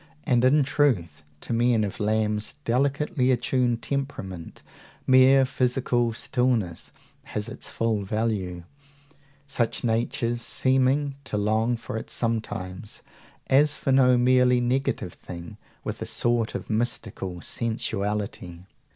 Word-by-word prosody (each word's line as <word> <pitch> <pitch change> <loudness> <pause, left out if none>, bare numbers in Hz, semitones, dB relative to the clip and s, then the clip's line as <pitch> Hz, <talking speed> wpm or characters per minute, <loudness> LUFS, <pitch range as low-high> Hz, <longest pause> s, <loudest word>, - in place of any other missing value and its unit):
And, 120 -1 +3
in 140 +3 +5
truth, 120 - +1 0.2
to - - -4
men 115 -1 +3
of 100 - -4
Lamb's 105 0 0
delicately 135 +1 +1
attuned 125 -1 +1
temperament 100 -11 -5 0.4
mere 130 +1 +6
physical 125 -2 0
stillness 115 -8 -1 0.4
has 105 +1 -4
its 120 +1 -9
full 115 -2 0
value; 100 -4 -2 0.8
such 125 -5 -1
natures 120 +1 0
seeming 135 +3 +1
to 110 - -3
long 110 +3 +1
for 110 - -6
it - - -7
sometimes, 105 -4 -3 0.4
as 145 +2 +4
for 135 - -1
no 125 -1 +5
merely 125 0 +4
negative 120 -7 -1
thing, 85 -1 -9 0.3
with - - -5
a - - -3
sort 120 -2 0
of - - -5
mystical 110 -5 -3
sensuality. 105 -5 -3
120 Hz, 115 wpm, -25 LUFS, 105-130 Hz, 0.8 s, mere